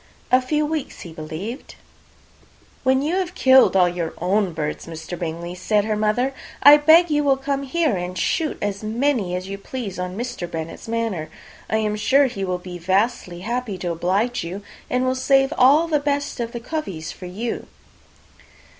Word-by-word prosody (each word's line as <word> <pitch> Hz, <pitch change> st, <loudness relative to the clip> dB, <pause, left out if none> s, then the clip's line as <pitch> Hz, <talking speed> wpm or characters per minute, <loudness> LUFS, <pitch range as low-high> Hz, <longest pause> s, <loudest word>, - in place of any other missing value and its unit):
A 255 Hz, +1 st, +6 dB
few 300 Hz, +4 st, 0 dB
weeks, 310 Hz, -2 st, -4 dB
he 170 Hz, -, -9 dB
believed. 160 Hz, -, -7 dB, 1.1 s
"When 265 Hz, +1 st, +3 dB
you 330 Hz, +5 st, 0 dB
have 370 Hz, -1 st, -2 dB
killed 260 Hz, -5 st, +6 dB
all 180 Hz, -2 st, +5 dB
your 175 Hz, -2 st, -3 dB
own 190 Hz, +2 st, +1 dB
birds, 150 Hz, -1 st, -4 dB
Mr. 165 Hz, +2 st, -7 dB
Bingley," 170 Hz, 0 st, -5 dB
said 205 Hz, +3 st, +1 dB
her 215 Hz, -1 st, 0 dB
mother, 215 Hz, +6 st, +1 dB, 0.3 s
"I 290 Hz, +1 st, +10 dB
beg 320 Hz, +3 st, +6 dB
you 295 Hz, 0 st, +2 dB
will 275 Hz, -2 st, +3 dB
come 275 Hz, 0 st, -2 dB
here 285 Hz, -2 st, 0 dB
and 180 Hz, 0 st, -4 dB
shoot 320 Hz, -3 st, 0 dB
as 205 Hz, 0 st, -3 dB
many 220 Hz, -4 st, 0 dB
as 185 Hz, +1 st, -4 dB
you 195 Hz, 0 st, -6 dB
please 205 Hz, -4 st, -6 dB
on 180 Hz, +1 st, -4 dB
Mr. 240 Hz, -7 st, -4 dB
Bennet's 165 Hz, +4 st, -6 dB
manor. 225 Hz, -8 st, -2 dB, 0.4 s
I 220 Hz, -, +2 dB
am 210 Hz, -1 st, 0 dB
sure 270 Hz, +7 st, +4 dB
he 235 Hz, -7 st, -3 dB
will 185 Hz, -1 st, -1 dB
be 180 Hz, 0 st, -9 dB
vastly 185 Hz, -1 st, 0 dB
happy 235 Hz, -1 st, -3 dB
to 175 Hz, -1 st, -3 dB
oblige 190 Hz, +8 st, 0 dB
you, 185 Hz, +4 st, -6 dB, 0.3 s
and 250 Hz, 0 st, +1 dB
will 255 Hz, -, +2 dB
save 270 Hz, +2 st, +3 dB
all 285 Hz, +6 st, +5 dB
the 305 Hz, -2 st, +2 dB
best 285 Hz, -1 st, -2 dB
of 235 Hz, -1 st, -3 dB
the 235 Hz, -, -5 dB
coveys 230 Hz, -, -5 dB
for 180 Hz, -, -9 dB
you." 220 Hz, +6 st, -4 dB
220 Hz, 180 wpm, -22 LUFS, 180-270 Hz, 1.1 s, I